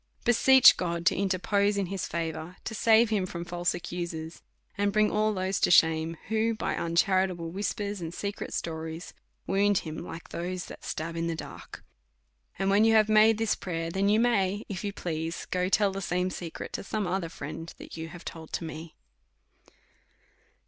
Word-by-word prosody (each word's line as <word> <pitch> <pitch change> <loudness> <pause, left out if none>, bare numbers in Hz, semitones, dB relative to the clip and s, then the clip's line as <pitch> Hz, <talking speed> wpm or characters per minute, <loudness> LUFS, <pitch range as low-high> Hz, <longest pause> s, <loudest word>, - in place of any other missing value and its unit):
Beseech 260 +2 +7
God 170 -1 -2
to - - +4
interpose 200 +2 +1
in 200 - +1
liis 195 -2 -3
favour, 165 +1 -4
to 225 - -5
save 225 +1 +4
him 195 -4 +1
from 170 -1 -6
false 175 0 -1
accusers, 170 -2 -5 0.3
and 200 0 +1
bring 215 +1 +3
all 215 +1 +2
those 190 -1 -1
to - - +3
shame 160 -1 +4
who, 220 +1 +1
by - - -2
uncharitable 175 0 +1
whispers 200 +1 -3
and 165 -1 -4
secret 200 +3 -5
stories, 160 0 -5 0.3
wound 200 0 +2
l)im, 155 0 -5
like 165 -1 -9
those 180 +1 -4
who - - -7
stab 165 +2 -4
in 165 0 -1
the 165 - -1
dark. - - -9 0.7
And 195 +1 +1
when 205 +2 +5
you 225 0 +5
have 215 -1 +5
made 215 0 +6
this 225 -1 +1
prayer, 165 -2 -4
then 195 +3 +1
you 215 +1 +4
may, 205 -4 +1
if 195 -1 -5
you 205 - -2
please, 165 -3 -4
go 180 0 0
tell 200 0 +3
the 195 +1 -5
same 180 0 -1
secret 170 -2 -7
to - - -4
some 210 +1 -2
other 180 -1 -2
friend, 165 0 -7
that - - -10
you 165 0 -5
have 170 +1 -11
told 160 -1 -8
to - - -2
me. 160 0 -8
185 Hz, 185 wpm, -28 LUFS, 165-205 Hz, 0.7 s, Beseech